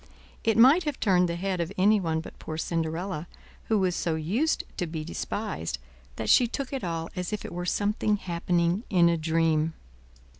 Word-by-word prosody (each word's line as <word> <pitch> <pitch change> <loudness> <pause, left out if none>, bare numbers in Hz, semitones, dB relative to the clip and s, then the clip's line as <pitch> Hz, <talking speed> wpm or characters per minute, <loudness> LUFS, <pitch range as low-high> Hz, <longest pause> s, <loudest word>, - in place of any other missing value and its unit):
It 225 -1 +2
might 275 +9 +7
have 295 -3 -2
turned 180 -4 +3
the 170 - -1
head 185 0 -1
of 170 +2 -3
anyone 185 -5 +3
but - - -12
poor 155 - -6
Cinderella, 165 +1 -2 0.4
who 220 - +2
was 185 -3 +1
so 165 -2 0
used 210 - 0
to 180 - -1
be 160 -1 -4
despised, 170 - -4 0.4
that 110 - -4
she 245 - +6
took 275 +3 -4
it 270 - -3
all 165 -2 -3
as 180 +1 -3
if 210 - -3
it - - -7
were 175 +1 -4
something 210 +2 +1
happening 175 0 0
in 175 -3 +5
a 170 - +2
dream. 160 0 +1
175 Hz, 185 wpm, -27 LUFS, 165-210 Hz, 0.4 s, might